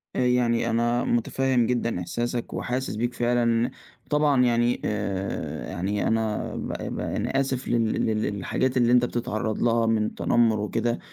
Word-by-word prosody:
يعني 125 -2 +2
أنا 120 +1 +1
مُتفهم 125 +1 +1
جدًا 115 -5 -1
إحساسك 120 +6 -3
وحاسس 125 -2 -2
بيك 120 +2 -1
فعلًا، 120 0 +1 0.4
طبعًا 145 -3 +3
يعني 120 0 +2
آآ، 100 - -3
يعني 100 +6 -1
أنا 110 -1 -1
ب - - -4 0.3
ب - - -4
أنا 135 - -1
آسف 130 -1 -2
لل 115 -1 +2 0.2
لل 110 -1 0
للحاجات 110 +6 -1
اللي 120 -1 +3
أنت 125 0 +5
بتتعرّض 110 -2 -2
لها 115 -1 +3
من 110 -1 +2
التنمر 115 -1 +2
وكده، 115 +3 -1
120 Hz, 145 wpm, -25 LUFS, 110-125 Hz, 0.4 s, أنت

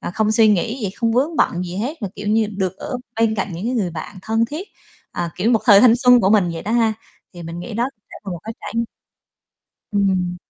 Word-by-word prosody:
ờ, - - -4
không 215 -1 +1
suy 220 0 +5
nghĩ 220 +5 +1
gì, 200 -3 -2
không 230 +3 -1
vướng 290 +7 +1
bận 175 +1 +1
gì 180 +1 -6
hết 250 +6 -4
mà, 200 - -2
kiểu 205 0 -5
như, 220 0 +3
được 190 -1 -2
ở 250 - -5 0.2
bên 225 -1 +3
cạnh 200 - -3
những 175 +5 -6
cái 250 - -1
người 195 -7 0
bạn 165 +5 -7
thân 225 +2 +1
thiết, 330 +7 -6 0.4
ờ, 170 - -2
kiểu, 205 +6 +1
một 225 -3 +3
thời 205 -4 +8
thanh 240 -1 +6
xuân 250 -1 +6
của 190 -1 +2
mình 200 -5 +4
vậy 165 - -6
đó 210 - -4
ha, 230 -2 +3 0.4
thì 175 -2 -10
mình 165 +1 -6
nghĩ 210 +5 -7
đó 240 +3 0 0.2
sẽ - - -10
là 195 - -5
một 175 - -4
cái 225 - -6
trải - - -7 1.2
Ừm, 200 -1 +2
ừm. 180 -1 -1
215 Hz, 255 wpm, -20 LUFS, 185-230 Hz, 1.2 s, thời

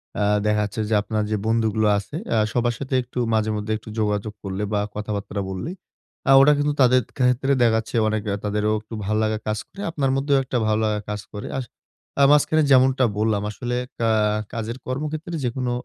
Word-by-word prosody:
অ্যা 105 - 0 0.2
দেখাচ্ছে 105 0 0
যে - - 0
আপনার 105 +1 -2
যে 110 - +1
বন্ধুগুলো 110 -1 +2
আছে, 100 +7 -6
অ্যা 110 - +2
সবার 120 0 +1
সাথে 135 -1 -5
একটু 125 0 -6
মাঝে 110 0 +1
মধ্যে 105 +1 -3
একটু 110 - -13
যোগাযোগ 105 0 -1
করলে 95 +1 -3
বা 105 - +2 0.2
কথাবাত্রা 105 -1 -4
বললেই, 95 - -5 0.5
অ্যা 135 - +5
ওটা 150 +2 +6
কিন্তু 145 0 +1
তাদের 130 0 +5 0.2
ক্ষেত্রে 125 +2 +2
দেখা 115 -2 +4
যাচ্ছে 110 +2 -4
অনেক 110 0 0 0.2
তাদেরও 105 +1 0
একটু 110 +2 -13
ভালো 105 +2 0
লাগা 110 0 0
কাজ 110 0 -1
করে। 200 - -10
আপনার 140 -4 0
মধ্যেও 140 +1 +2
একটা 130 -1 -2
ভালো 110 0 +2
লাগা 105 -1 0
কাজ 105 -1 -3
করে 105 - -6
আসে। 125 -4 -5 0.5
আ - - +7
মাঝখানে 155 +1 +4
যেমনটা 130 0 +5
বললাম 105 -1 +1
আসলে 120 +3 -4 0.2
কা 115 - +2 0.4
কাজের 115 +1 -4
কর্মক্ষেত্রে 155 +5 -4
যেকোনো 125 +1 -2
110 Hz, 190 wpm, -23 LUFS, 105-130 Hz, 0.5 s, আ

